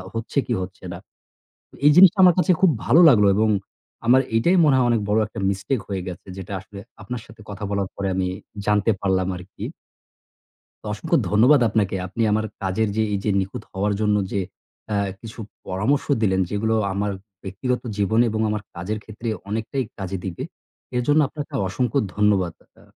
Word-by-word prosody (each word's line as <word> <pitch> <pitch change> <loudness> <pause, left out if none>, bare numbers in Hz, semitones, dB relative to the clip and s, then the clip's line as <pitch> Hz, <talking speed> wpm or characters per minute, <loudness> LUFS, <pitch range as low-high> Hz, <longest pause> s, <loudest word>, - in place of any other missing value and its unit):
হচ্ছে 115 +5 -3
কী, 120 - 0
হচ্ছে 95 0 -9
না। 90 - -7 0.9
এই - - +9
জিনিসটা 190 +1 +8
আমার 180 - +7
কাছে 180 0 +4
খুব 190 - +6
ভালো 165 - +5
লাগলো 105 -5 +5
এবং 110 +1 +3 0.6
আমার 130 +2 +6
এইটাই 170 +12 +3
মনে 145 -3 +4
হয় 125 -2 +3
অনেক 115 -2 +2
বড় 105 +1 +2
একটা 105 - -8
mistake 105 +5 -2
হয়ে 95 -2 -3
গেছে, 90 - -8
যেটা 95 +2 -7
আসলে 100 +1 -12 0.2
আপনার 125 -1 -5
সাথে 110 0 -16
কথা 105 +1 -6
বলার 100 -2 -1
পরে 100 0 -3
আমি 95 0 0 0.4
জানতে 105 +1 +3
পারলাম 95 -2 +1
আরকি 90 +2 -9 1.2
তো - - -14
অসংখ্য - - 0
ধন্যবাদ 125 +6 +5
আপনাকে। 100 -2 0
আপনি 95 +5 -4
আমার 110 +1 +1 0.2
কাজের 95 +3 0
যে, 110 - +3
এই 100 - 0
যে - - 0
নিখুঁত 95 0 -4
হওয়ার 100 +2 0
জন্য 105 -1 +2 0.2
যে 100 - 0 0.5
অ্যা 105 - -1 0.2
কিছু 115 0 -10 0.3
পরামর্শ 105 +10 0 0.2
দিলেন, 95 -3 +2
যেগুলো 110 +2 0 0.2
আমার 100 +1 -1 0.3
ব্যক্তিগত 110 +7 -2 0.2
জীবনে 110 +4 +3
এবং 110 0 -1
আমার 105 -1 -2
কাজের 90 +5 -3
ক্ষেত্রে 110 +2 -8 0.2
অনেকটাই 110 +5 -2
কাজে 95 -1 -4
দিবে। 90 -3 -4 0.5
এর 125 - +2
জন্য 150 +1 +4
আপনাকে 145 0 -8
অসংখ্য 125 +6 -1 0.2
ধন্যবাদ 100 -5 +2 0.3
আ - - -19
105 Hz, 180 wpm, -22 LUFS, 95-120 Hz, 1.2 s, এই